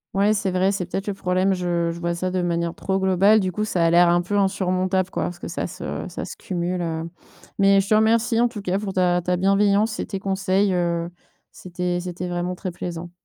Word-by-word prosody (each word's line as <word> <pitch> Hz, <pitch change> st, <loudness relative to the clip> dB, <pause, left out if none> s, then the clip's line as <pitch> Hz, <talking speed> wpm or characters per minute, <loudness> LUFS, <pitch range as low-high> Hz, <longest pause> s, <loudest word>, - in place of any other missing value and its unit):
Ouais, 200 Hz, +2 st, +3 dB
c'est 210 Hz, -2 st, -1 dB
vrai, 185 Hz, +1 st, +2 dB
c'est 190 Hz, -3 st, -3 dB
peut-être 195 Hz, +2 st, -4 dB
le 205 Hz, -, -2 dB
problème, 185 Hz, 0 st, +1 dB
je 175 Hz, -2 st, -1 dB
je 170 Hz, -, -7 dB
vois 170 Hz, 0 st, -1 dB
ça 185 Hz, +2 st, -2 dB
de 185 Hz, 0 st, 0 dB
manière 170 Hz, -1 st, -1 dB
trop 190 Hz, +1 st, -2 dB
globale, 190 Hz, +3 st, +4 dB
du 185 Hz, -2 st, -1 dB
coup 210 Hz, +4 st, -2 dB
ça 180 Hz, -5 st, +1 dB
a 165 Hz, -, +3 dB
l'air 175 Hz, 0 st, +6 dB
un 175 Hz, 0 st, +3 dB
peu 205 Hz, +4 st, -3 dB
insurmontable 185 Hz, -1 st, 0 dB
quoi -, -, -2 dB
parce 175 Hz, -, -5 dB
que -, -, -7 dB
ça -, -, -3 dB
se -, -, -6 dB
ça -, -, -5 dB
se -, -, -8 dB
cumule, 180 Hz, 0 st, -3 dB
heu, 165 Hz, -1 st, -3 dB, 0.5 s
mais 195 Hz, 0 st, +5 dB
je 195 Hz, +1 st, -2 dB
te -, -, +4 dB
remercie 225 Hz, +1 st, +3 dB
en 240 Hz, -, +4 dB
tout 220 Hz, -4 st, -8 dB
cas 190 Hz, 0 st, 0 dB
pour 205 Hz, -2 st, -4 dB
ta 180 Hz, -1 st, +2 dB
ta 180 Hz, +1 st, 0 dB
bienveillance 200 Hz, +3 st, +2 dB
et -, -, -3 dB
tes 195 Hz, -, -4 dB
conseils, 195 Hz, 0 st, +1 dB
heu, 170 Hz, -1 st, -1 dB, 0.4 s
c'était 180 Hz, 0 st, -3 dB
c'était 180 Hz, 0 st, -5 dB
vraiment 175 Hz, +1 st, -2 dB
très 185 Hz, 0 st, -5 dB
plaisant. 175 Hz, 0 st, -6 dB
185 Hz, 235 wpm, -23 LUFS, 175-195 Hz, 0.5 s, l'air